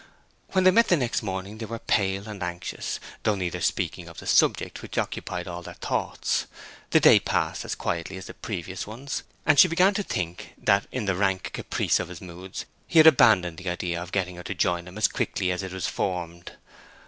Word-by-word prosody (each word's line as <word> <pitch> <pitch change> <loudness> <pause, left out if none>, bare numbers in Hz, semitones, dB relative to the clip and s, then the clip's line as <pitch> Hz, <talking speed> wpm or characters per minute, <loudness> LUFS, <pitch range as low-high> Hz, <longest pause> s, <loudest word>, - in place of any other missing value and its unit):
When 185 -1 +3
they 185 - +7
met 230 +4 +5
the 175 - +4
next 125 -5 0
morning 100 +1 -5
they 110 - -5
were 115 +1 -4
pale 100 -2 0
and 105 -2 -7
anxious, 90 0 -4 0.2
though 105 - +2
neither 90 -3 -3
speaking - - -1
of - - -12
the - - -9
subject - - +2
which - - -8
occupied 90 0 -3
all 90 -1 -5
their - - -9
thoughts. - - -1 0.4
The - - +5
day - - +7
passed - - -1
as - - -3
quietly 85 +3 -3
as 95 - -8
the - - -9
previous 95 -2 -5
ones, 125 +6 -5 0.2
and 150 -2 +5
she 185 - +10
began 180 +4 +4
to 205 - -1
think 90 - -4
that 100 0 +2
in 125 -4 -3
the 95 - +1
rank 95 0 0
caprice - - 0
of - - -3
his 90 -2 -9
moods 90 +1 -8 0.2
he - - 0
had 155 - +9
abandoned 95 - +6
the 95 -1 -4
idea 90 -1 -2
of 90 +1 -8
getting 90 -2 -1
her 90 - -8
to 95 - -4
join 85 +1 0
him 90 +3 -10
as 110 - +4
quickly 90 - -1
as 90 - -2
it 95 -1 -6
was 95 -2 -3
formed. 85 -2 -3
95 Hz, 215 wpm, -26 LUFS, 90-110 Hz, 0.4 s, she